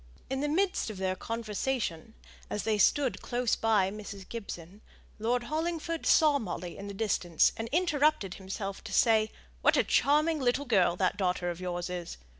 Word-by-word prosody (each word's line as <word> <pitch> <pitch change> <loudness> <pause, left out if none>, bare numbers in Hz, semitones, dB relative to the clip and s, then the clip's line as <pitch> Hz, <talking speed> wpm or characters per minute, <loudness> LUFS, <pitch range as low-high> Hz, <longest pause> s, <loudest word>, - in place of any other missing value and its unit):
In 265 0 -1
the 295 - 0
midst 365 - +1
of 215 - -7
their 185 0 -1
conversation, 225 -2 -3 0.3
as 210 - -2
they 215 -2 +1
stood 270 +5 +3
close 245 -1 0
by 210 -4 +2
Mrs. 200 -2 -8
Gibson, 200 -4 -8 0.4
Lord 240 +3 0
Hollingford 325 +4 -2
saw 300 -3 +5
Molly 180 -5 -5
in 200 - -8
the 200 - -7
distance, 185 -6 +2
and 225 0 -5
interrupted 305 - +2
himself 195 +1 -6
to 210 - -6
say, 220 -1 +4 0.3
"What - - +4
a - - +4
charming 305 +2 +3
little 260 +2 +1
lady 190 -8 +3
that 185 +2 0
daughter 180 -2 0
of 175 +1 -8
yours 175 -1 -3
is! 180 - -5
220 Hz, 170 wpm, -30 LUFS, 190-270 Hz, 0.4 s, saw